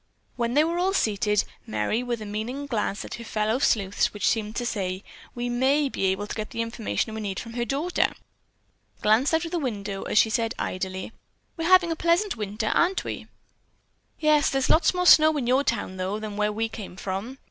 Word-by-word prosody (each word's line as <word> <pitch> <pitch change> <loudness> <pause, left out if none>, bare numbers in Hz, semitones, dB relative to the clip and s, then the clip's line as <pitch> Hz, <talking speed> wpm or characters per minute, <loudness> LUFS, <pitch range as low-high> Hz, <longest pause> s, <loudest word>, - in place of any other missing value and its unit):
When 235 +1 -1
they 300 - +6
were 335 +2 -1
all 380 +2 +1
seated, 210 - +1 0.2
Merry, 110 - 0
with 240 -3 -3
a - - -7
meaning 220 +7 -4
glance 215 -6 -2
at - - -8
her 235 - -6
fellow 220 +2 0
sleuths 200 -7 +1
which 205 - 0
seemed 215 -1 0
to 245 - -2
say, 190 -4 -2 0.3
"We 240 0 -2
may 270 +4 +2
be 195 - -2
able 190 +2 0
to - - -6
get 215 -1 -4
the 230 - -2
information 230 -1 -2
we 220 - -4
need 195 -3 -3
from 230 - -8
the 240 0 -2
daughter," 310 +6 +1 0.9
glanced 220 +6 +4
out 320 0 +1
of 330 - -6
the 350 - 0
window 205 -7 -3
as - - -2
she 220 - +5
said 225 +2 0
idly, 185 +2 -4 0.4
"We're 330 -1 -2
having 365 -2 +6
a - - 0
pleasant 340 +5 +1
winter, 215 0 -2
aren't 365 +3 +2
we?" - - -6 0.9
"Yes, 305 -2 +4
there's 270 -1 +1
lots 335 +3 +4
more 360 0 0
snow 310 -2 +7
in 265 - -1
your 260 +3 +3
town, 205 -7 -2
though, 185 +3 -2
than 215 -1 -6
where 210 0 +1
we 225 +2 -1
came 215 -4 -8
from." 195 +7 -5
230 Hz, 210 wpm, -25 LUFS, 210-285 Hz, 0.9 s, snow